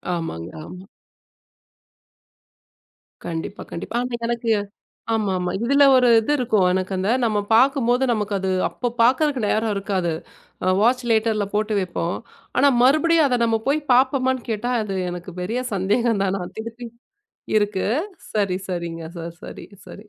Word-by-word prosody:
ஆமாங்க, 85 Hz, -, -5 dB, 0.2 s
ஆமா. 185 Hz, +1 st, -11 dB, 2.4 s
கண்டிப்பா, 165 Hz, +4 st, -5 dB
கண்டிப்பா. 170 Hz, -, -6 dB
ஆனா 250 Hz, -1 st, -3 dB
எனக்கு 235 Hz, -1 st, -1 dB, 0.6 s
ஆமாமா. 190 Hz, -5 st, 0 dB
இதுல 280 Hz, +3 st, +4 dB
ஒரு 250 Hz, -1 st, +5 dB
இது 225 Hz, +6 st, -2 dB
இருக்கும். 220 Hz, -7 st, +2 dB
எனக்கு 185 Hz, +1 st, -1 dB
அந்த 190 Hz, +2 st, -1 dB
நம்ம 215 Hz, -3 st, +1 dB
பார்க்கும்போது 250 Hz, +1 st, +3 dB
நமக்கு 210 Hz, -2 st, -1 dB
அது 190 Hz, 0 st, -2 dB, 0.2 s
அப்ப 245 Hz, -2 st, -3 dB
பார்க்கிறதுக்கு 260 Hz, +3 st, +3 dB
நேரம் 220 Hz, +1 st, +1 dB
இருக்காது. 190 Hz, -3 st, -1 dB, 0.5 s
ஆ -, -, 0 dB
வாட்ச் 250 Hz, +3 st, +3 dB
லேட்டர்ல 220 Hz, -2 st, +2 dB
போட்டு 215 Hz, +1 st, 0 dB
வைப்போம். 175 Hz, -2 st, -2 dB, 0.4 s
ஆனால், 280 Hz, -2 st, +4 dB
மறுபடியும் 310 Hz, +4 st, +4 dB
அதை 250 Hz, -2 st, +1 dB
நம்ம 225 Hz, -1 st, +2 dB
போய்ப் 290 Hz, 0 st, 0 dB
பார்ப்போமான்னு 260 Hz, 0 st, +2 dB
கேட்டால் 240 Hz, +3 st, -1 dB
அது 195 Hz, -2 st, -4 dB
எனக்குப் 175 Hz, +1 st, -7 dB
பெரிய 220 Hz, +7 st, -2 dB
சந்தேகம் 205 Hz, +3 st, +1 dB
தான். 195 Hz, 0 st, -1 dB, 0.2 s
திருப்பி 230 Hz, +2 st, -7 dB, 0.7 s
இருக்கு. 205 Hz, -2 st, 0 dB, 0.5 s
சரி, 200 Hz, -4 st, +1 dB
சரிங்க 170 Hz, -2 st, -4 dB
சார். 170 Hz, 0 st, -7 dB
சரி, -, -, -9 dB, 0.2 s
சரி. 205 Hz, -, -11 dB
220 Hz, 135 wpm, -22 LUFS, 190-245 Hz, 2.4 s, ஒரு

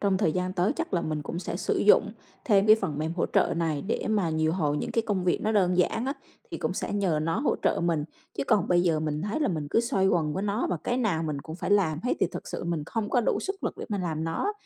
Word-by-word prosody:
trong 195 Hz, -2 st, +2 dB
thời 170 Hz, -6 st, +2 dB
gian 185 Hz, 0 st, -1 dB
tới 185 Hz, +6 st, +1 dB
chắc 330 Hz, -, -2 dB
là 175 Hz, -, +2 dB
mình 155 Hz, -1 st, -2 dB
cũng 170 Hz, -, -5 dB
sẽ -, -, -4 dB
sử -, -, -1 dB
dụng -, -, +4 dB, 0.3 s
thêm 205 Hz, -3 st, +4 dB
cái 215 Hz, 0 st, +8 dB
phần 170 Hz, -9 st, -3 dB
mềm 160 Hz, +2 st, -1 dB
hỗ 175 Hz, -, +1 dB
trợ -, -, +2 dB
này 160 Hz, -4 st, -1 dB
để 215 Hz, -, -2 dB
mà 205 Hz, -6 st, +1 dB
điều 160 Hz, 0 st, +1 dB
hồi 150 Hz, -5 st, 0 dB
những -, -, -3 dB
cái 230 Hz, -, +1 dB
công 200 Hz, -5 st, -1 dB
việc 175 Hz, -, +1 dB
nó 215 Hz, -, +1 dB
đơn 185 Hz, -4 st, +3 dB
giản 225 Hz, +7 st, +1 dB
á 275 Hz, -, 0 dB, 0.4 s
thì -, -, -4 dB
cũng -, -, -2 dB
sẽ -, -, -3 dB
nhờ 190 Hz, -6 st, +1 dB
nó 165 Hz, +5 st, 0 dB
hỗ 285 Hz, -, +1 dB
trợ -, -, +2 dB
mình. 165 Hz, -4 st, +1 dB, 0.3 s
Chứ 140 Hz, -, 0 dB
còn 200 Hz, -, +2 dB
bây 175 Hz, -1 st, +4 dB
giờ 165 Hz, -3 st, +2 dB
mình 155 Hz, 0 st, -2 dB
thấy 210 Hz, +9 st, -2 dB
là 295 Hz, -, +2 dB
mình 155 Hz, -5 st, -2 dB
cứ -, -, +4 dB
xoay 200 Hz, -5 st, +1 dB
quần 155 Hz, -5 st, +1 dB
với 190 Hz, -, -2 dB
nó 210 Hz, +3 st, 0 dB
và 180 Hz, -, 0 dB
cái 245 Hz, -, 0 dB
nào 195 Hz, -10 st, 0 dB
mình 150 Hz, -3 st, -3 dB
cũng 160 Hz, +3 st, -8 dB
phải 185 Hz, -, -4 dB
làm 170 Hz, -7 st, +3 dB
hết 250 Hz, -, 0 dB
thì -, -, +4 dB
thực -, -, -7 dB
sự -, -, -5 dB
mình 170 Hz, -3 st, -2 dB
không 220 Hz, +2 st, -3 dB
có 245 Hz, -, +3 dB
đủ -, -, 0 dB
sức 390 Hz, 0 st, -4 dB
lực -, -, -1 dB
để -, -, -5 dB
mà 205 Hz, -3 st, -2 dB
làm 160 Hz, -3 st, -2 dB
nó. 165 Hz, -, -1 dB
180 Hz, 295 wpm, -27 LUFS, 160-210 Hz, 0.4 s, cái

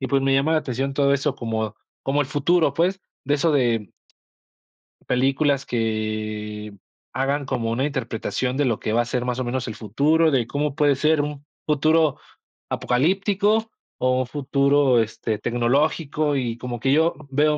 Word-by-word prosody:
y 130 Hz, -, -3 dB
pues, 140 Hz, -1 st, +2 dB
me 135 Hz, 0 st, +2 dB
llama 140 Hz, +4 st, +2 dB
la 160 Hz, -, +4 dB
atención 135 Hz, -1 st, -3 dB
todo 140 Hz, 0 st, +3 dB
eso 140 Hz, 0 st, 0 dB
como 110 Hz, -2 st, -3 dB, 0.3 s
como 140 Hz, +2 st, 0 dB
el 145 Hz, -, 0 dB
futuro, 145 Hz, +1 st, +2 dB
pues, 185 Hz, +4 st, +1 dB, 0.2 s
de 145 Hz, +2 st, +1 dB
eso 155 Hz, +2 st, +2 dB
de 115 Hz, -7 st, +1 dB, 1.2 s
películas 135 Hz, +2 st, +1 dB
que 110 Hz, -2 st, -3 dB, 0.4 s
hagan 140 Hz, +2 st, -1 dB
como 115 Hz, -3 st, -2 dB
una 130 Hz, +4 st, 0 dB
interpretación 125 Hz, -2 st, -2 dB
de 145 Hz, -, +1 dB
lo 115 Hz, -4 st, 0 dB
que 110 Hz, -, -2 dB
va 120 Hz, -, +3 dB
a -, -, -2 dB
ser 125 Hz, +1 st, -2 dB
más 125 Hz, 0 st, -2 dB
o 130 Hz, -, 0 dB
menos 125 Hz, +1 st, -3 dB
el 110 Hz, -, -5 dB
futuro 150 Hz, +9 st, +2 dB
de, 125 Hz, -4 st, +2 dB
¿cómo 145 Hz, +2 st, -2 dB
puede 145 Hz, -2 st, +3 dB
ser 155 Hz, +2 st, +2 dB
un 145 Hz, -1 st, -5 dB, 0.2 s
futuro 155 Hz, 0 st, +2 dB, 0.5 s
apocalíptico, 200 Hz, -, +1 dB, 0.3 s
o 130 Hz, 0 st, +1 dB
un 125 Hz, -, -3 dB
futuro, 140 Hz, -2 st, +2 dB
este, 110 Hz, 0 st, -3 dB
tecnológico?, 140 Hz, +5 st, 0 dB
y 120 Hz, -3 st, -2 dB
como 120 Hz, 0 st, -5 dB
que 135 Hz, +3 st, +2 dB
yo 160 Hz, +2 st, +3 dB
veo 150 Hz, +2 st, +2 dB
135 Hz, 170 wpm, -23 LUFS, 120-150 Hz, 1.2 s, la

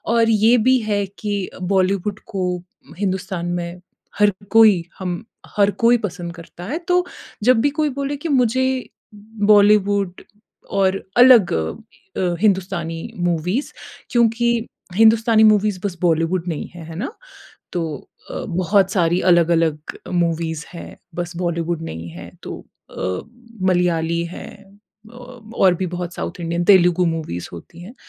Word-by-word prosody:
और 230 Hz, -1 st, +4 dB
ये 225 Hz, +2 st, +4 dB
भी 260 Hz, 0 st, +6 dB
है 205 Hz, -1 st, +1 dB
कि 205 Hz, -3 st, -2 dB
बॉलीवुड 195 Hz, +2 st, 0 dB
को 195 Hz, -4 st, -3 dB, 0.5 s
हिंदुस्तान 190 Hz, -2 st, -2 dB
में 175 Hz, 0 st, -5 dB, 0.4 s
हर 210 Hz, 0 st, +5 dB, 0.2 s
कोई 215 Hz, -6 st, +6 dB, 0.2 s
हम 180 Hz, -2 st, -4 dB, 0.3 s
हर 200 Hz, -1 st, +5 dB
कोई 235 Hz, +1 st, +5 dB
पसंद 180 Hz, -5 st, -5 dB
करता 170 Hz, 0 st, -12 dB
है। 275 Hz, -, -3 dB
तो 360 Hz, -, +3 dB, 0.5 s
जब 250 Hz, +1 st, +5 dB
भी 285 Hz, -, +3 dB
कोई 305 Hz, -1 st, +2 dB
बोले 280 Hz, +1 st, -3 dB
कि 335 Hz, -, -2 dB
मुझे 255 Hz, -3 st, +2 dB, 0.9 s
बॉलीवुड 205 Hz, -2 st, +3 dB, 0.6 s
और 195 Hz, 0 st, +2 dB, 0.2 s
अलग 245 Hz, -6 st, +7 dB
अ, 175 Hz, -, -4 dB
हिंदुस्तानी 180 Hz, -5 st, 0 dB, 0.3 s
मूवीज़ 180 Hz, -, -1 dB, 0.4 s
क्योंकि 235 Hz, 0 st, +2 dB, 0.5 s
हिंदुस्तानी 225 Hz, +1 st, +5 dB
मूवीज़ 210 Hz, -2 st, +4 dB
बस 185 Hz, -3 st, -3 dB
बॉलीवुड 165 Hz, +1 st, +1 dB
नहीं 160 Hz, -4 st, -3 dB
हैं, 170 Hz, -, -9 dB
है 165 Hz, 0 st, -9 dB
ना? 215 Hz, -, -4 dB, 0.6 s
तो 175 Hz, -, -1 dB, 0.5 s
अ, -, -, -6 dB, 0.2 s
बहुत 190 Hz, +1 st, +2 dB
सारी 175 Hz, -2 st, +2 dB
अलग-अलग 165 Hz, -3 st, +1 dB
मूवीज़ 165 Hz, -2 st, -1 dB
हैं, 170 Hz, -, -9 dB, 0.2 s
बस 175 Hz, 0 st, -5 dB
बॉलीवुड 170 Hz, -1 st, -2 dB
नहीं 80 Hz, +1 st, -7 dB
है। 85 Hz, +1 st, -10 dB
तो -, -, -7 dB, 0.3 s
अ, -, -, -14 dB, 0.7 s
मलयाली 170 Hz, -2 st, +1 dB
है -, -, -8 dB, 0.7 s
अ, -, -, -16 dB
और 235 Hz, -6 st, -1 dB
भी 185 Hz, +2 st, -2 dB
बहुत 175 Hz, 0 st, -5 dB
साउथ 175 Hz, -, -5 dB
इंडियन 170 Hz, +1 st, -2 dB
तेलुगु 180 Hz, -2 st, +5 dB
मूवीज़ 160 Hz, -, -3 dB
होती 90 Hz, -, -11 dB
हैं। 205 Hz, +8 st, -11 dB
185 Hz, 135 wpm, -20 LUFS, 170-215 Hz, 0.9 s, अलग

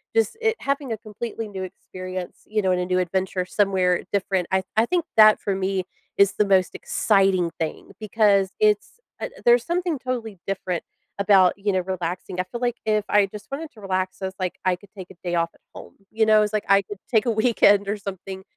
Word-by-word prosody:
just 225 Hz, -, +2 dB
it 450 Hz, 0 st, +1 dB
having 280 Hz, -2 st, -2 dB
a 220 Hz, -, -4 dB
completely 225 Hz, +1 st, -6 dB
new 190 Hz, -2 st, -6 dB
experience, 185 Hz, -1 st, -8 dB
you 215 Hz, 0 st, -1 dB
know, 190 Hz, -1 st, +1 dB
in 180 Hz, -, +2 dB
a 180 Hz, -, -1 dB
new 185 Hz, 0 st, +1 dB
adventure 185 Hz, 0 st, -1 dB
somewhere 190 Hz, -3 st, +1 dB
different. 190 Hz, -3 st, 0 dB
I 190 Hz, 0 st, +3 dB, 0.2 s
I 225 Hz, -, +5 dB
think 345 Hz, +4 st, 0 dB
that 215 Hz, -1 st, +8 dB
for 200 Hz, -, -2 dB
me 190 Hz, -1 st, -1 dB, 0.3 s
is 200 Hz, 0 st, +4 dB
the 210 Hz, -, +2 dB
most 190 Hz, -2 st, +2 dB
exciting 195 Hz, -4 st, +2 dB
thing 160 Hz, -1 st, -4 dB
because 205 Hz, -3 st, +2 dB
it's, 210 Hz, -, +1 dB, 0.2 s
uh -, -, -4 dB, 0.2 s
there's 240 Hz, 0 st, +5 dB
something 345 Hz, -3 st, -1 dB
totally 240 Hz, -5 st, -4 dB
different 185 Hz, -3 st, -3 dB, 0.4 s
about, 195 Hz, -3 st, +5 dB
you 205 Hz, 0 st, 0 dB
know, 185 Hz, -, +1 dB
relaxing, 180 Hz, 0 st, -4 dB
I -, -, +2 dB
feel 235 Hz, +6 st, -7 dB
like 240 Hz, -1 st, 0 dB
if 215 Hz, -1 st, +1 dB
I 205 Hz, -1 st, +4 dB
just 210 Hz, +1 st, -10 dB
wanted 300 Hz, +3 st, -5 dB
to 215 Hz, -, -16 dB
relax, 185 Hz, -1 st, -2 dB
I -, -, -2 dB
was 190 Hz, -, -4 dB
like, 185 Hz, -1 st, -3 dB
I 185 Hz, -1 st, +3 dB
could 200 Hz, +3 st, -19 dB
take 185 Hz, -1 st, -8 dB
a -, -, -14 dB
day 175 Hz, -1 st, -1 dB
off 165 Hz, 0 st, +1 dB
at -, -, -27 dB
home, -, -, -11 dB, 0.2 s
you 220 Hz, 0 st, +2 dB
know? 215 Hz, 0 st, +5 dB
It -, -, +6 dB
was 210 Hz, 0 st, -1 dB
like 215 Hz, -, -1 dB
I 195 Hz, 0 st, +5 dB
could 205 Hz, 0 st, -9 dB
take 220 Hz, -4 st, +3 dB
a 235 Hz, -, +3 dB
weekend 210 Hz, -3 st, +4 dB
or 205 Hz, +1 st, -1 dB
something. 190 Hz, -1 st, -7 dB
200 Hz, 225 wpm, -23 LUFS, 185-220 Hz, 0.4 s, that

